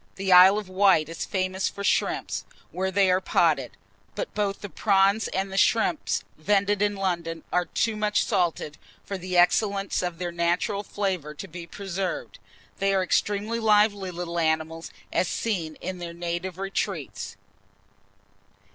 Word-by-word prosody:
The 195 0 -2
Isle 185 +3 +9
of 210 -2 -4
Wight 185 -5 +3
is 165 - -5
famous 185 0 -1
for 200 - -7
shrimps, - - 0 0.3
where 190 +1 -1
they 190 0 +3
are 185 +1 +2
potted; - - +1 0.4
but - - -4
both 200 -1 -1
the 205 - -5
prawns 200 +2 +2
and 190 +1 -2
the 195 - +1
shrimps 230 - +2 0.2
vended 200 +3 +2
in 205 0 +2
London, 170 -4 -2
are 180 0 +2
too 225 +4 -1
much 210 -1 +1
salted 170 -7 -1 0.3
for 200 - -4
the 185 -1 -3
excellence 195 +3 +2
of 175 -2 -3
their 175 0 -3
natural 175 +4 0
flavour 185 -7 -3
to - - -7
be 170 +1 -9
preserved. 195 0 -4 0.4
They 195 0 +2
are 190 - +2
extremely 210 +4 0
lively 210 -3 +3
little 170 -1 -4
animals, 160 0 -1 0.2
as 180 - +2
seen 170 -9 -2
in 185 -1 -5
their 170 -1 -6
native 175 +1 -4
retreats. 195 - -4
190 Hz, 155 wpm, -26 LUFS, 175-200 Hz, 0.4 s, Isle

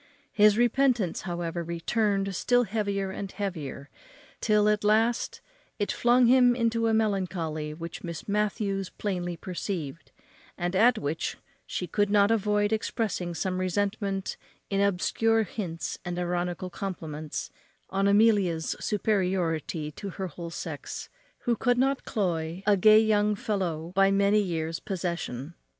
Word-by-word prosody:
His 210 0 +5
repentance, 240 -5 +2
however, 170 0 -3
returned 195 +3 0
still 245 +6 +3
heavier 200 -2 -2
and 195 0 -5
heavier, 160 -9 -5 0.5
till, 210 -1 +3
at 210 0 +2
last, 225 +3 +2 0.4
it 205 - -1
flung 245 +1 +4
him 245 0 +6
into 230 -1 +1
a - - +2
melancholy, 180 -8 -1
which 165 +1 -7
Miss 170 -2 -6
Matthews 200 -2 -1
plainly 180 -4 -3
perceived, 170 -4 -5 0.5
and 175 +1 -2
at 235 +4 +5
which 150 0 -2 0.3
she 180 - -3
could 205 +4 0
not 205 0 +4
avoid 210 -1 +2
expressing 205 -5 -2
some 185 +3 -1
resentment 195 +1 -1 0.3
in 195 0 +2
obscure 220 +3 +2
hints 170 -4 -5
and 175 0 -4
ironical 180 0 -2
compliments 160 -6 -5 0.4
on 195 +1 +2
Amelia's 200 -6 +3
superiority 180 -7 0
to 200 +6 -7
her 190 +1 -5
whole 170 0 -7
sex, 160 -3 -6 0.3
who 240 - +1
could 245 +2 +1
not 270 +2 +1
cloy 175 -4 -2
a 205 -1 +5
gay 215 +3 +7
young 210 -1 +3
fellow 175 -6 -2
by 195 0 +4
many 200 +1 +3
years' 165 -4 -2
possession. 170 -6 -4
195 Hz, 135 wpm, -27 LUFS, 175-210 Hz, 0.5 s, gay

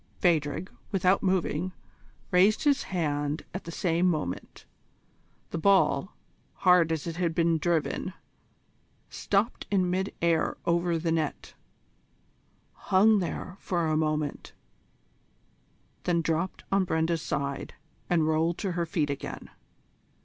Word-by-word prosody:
Phadrig, 165 +1 +1 0.2
without 190 -1 +3
moving, 185 -2 0 0.6
raised 195 +7 +4
his 285 -2 +3
hand 150 -4 -2
at 190 - -6
the 170 - -6
same 175 +1 +1
moment. 150 - -3 0.9
The 170 - -2
ball, 190 -3 +3 0.4
hard 180 -3 +4
as 160 -2 -2
it 165 -1 -5
had 170 -2 0
been 165 -1 +2
driven, 170 +2 -1 1.0
stopped 205 +4 -1
in 185 -3 +2
mid 190 +2 -1
air 170 -1 +1
over 170 0 +1
the 165 0 -1
net, 160 -3 -2 1.2
hung 210 +3 +4
there 180 +1 -4
for 175 -2 -1
a 155 -1 +1
moment, 155 -2 -1 1.5
then 170 -2 +1
dropped 165 +4 -1
on 195 0 +3
Brenda's 160 -1 0
side 140 -2 -3 0.3
and 165 -3 +2
rolled 160 +2 +1
to 195 - -2
her 170 -1 -2
feet 155 -3 0
again. 140 - -6
170 Hz, 120 wpm, -28 LUFS, 160-185 Hz, 1.5 s, raised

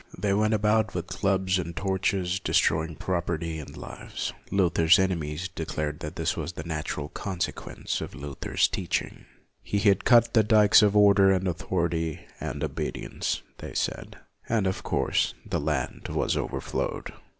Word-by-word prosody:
They 100 -2 +1
went 110 +2 +2
about 105 -1 +2
with 85 -2 -2
clubs 95 0 +1
and 85 -1 -5
torches, 95 -1 0
destroying 80 -3 +1
property 85 -3 -2
and 75 - -9
lives. - - -6 0.2
Luther's 85 -3 +4
enemies 90 -3 -1
declared 75 -3 -4
that 75 0 -6
this 80 -2 -1
was 85 - -4
the 80 - -6
natural 75 -2 -4
consequence 90 +1 -4
of - - -6
Luther's 70 0 0
teaching. 90 -4 -3 0.4
He 105 - -2
had 100 -1 +3
cut 120 -2 +5
the 110 - +6
dikes 105 -1 +6
of 105 0 +4
order 100 -1 +6
and 95 0 +1
authority 85 -2 -2
and - - -4
obedience, - - -3 0.2
they - - -8
said, - - -3 0.3
and, 110 -4 +2
of 95 0 -1
course, - - 0
the - - -1
land 75 -3 -2
was - - 0
overflowed. - - -3
90 Hz, 150 wpm, -27 LUFS, 80-100 Hz, 0.4 s, the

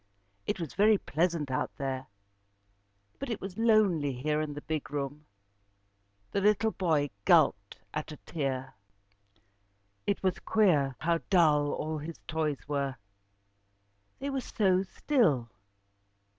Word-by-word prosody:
It - - -1
was 165 -5 -5
very 210 +1 +5
pleasant 165 -5 -1
out 130 - 0
there, 135 -1 -3 1.1
but 275 - -4
it 225 - -2
was 195 +1 -7
lonely 200 - +3
here 150 +4 0
in 150 -2 -4
the 145 - -7
big 155 -2 -3
room. 145 +1 -4 1.0
The 200 - 0
little 210 +2 +3
boy 155 -8 +1
gulped - - +3 0.2
at 155 +1 -4
a 150 - -8
tear. 135 -4 -3 1.3
It 200 - 0
was 185 -2 +1
queer 155 -12 +2
how 165 +1 +2
dull 150 -6 +4
all 155 0 -3
his 160 +2 -7
toys 155 -3 -2
were. 140 -2 -1 1.2
They 280 +1 -3
were 270 -1 -1
so 190 -6 +2
still. 180 - +1
155 Hz, 130 wpm, -30 LUFS, 145-195 Hz, 1.3 s, very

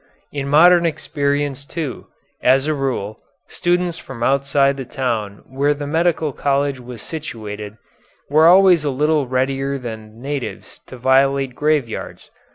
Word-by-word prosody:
In 140 -1 -4
modern 175 +4 +6
experience, 145 -3 -2
too, 145 -2 -6 0.3
as 130 +2 +4
a 155 - +1
rule, 130 -7 -3 0.3
students 175 -1 -1
from 120 -3 -7
outside 140 +1 +2
of 140 - -7
the 135 - -5
town 115 -7 -3
where 140 +3 0
the 145 0 -5
medical 160 -1 0
college 140 -1 0
was 125 -2 -9
situated, 110 -9 -7 0.5
were 155 +3 +5
always 180 -2 +6
a 145 - 0
little 150 +1 +1
readier 135 +2 -1
than 110 -3 -8
natives 140 0 -6
to 130 - -10
violate 135 +1 +2
graveyards. 145 -5 -2
140 Hz, 140 wpm, -19 LUFS, 125-150 Hz, 0.5 s, modern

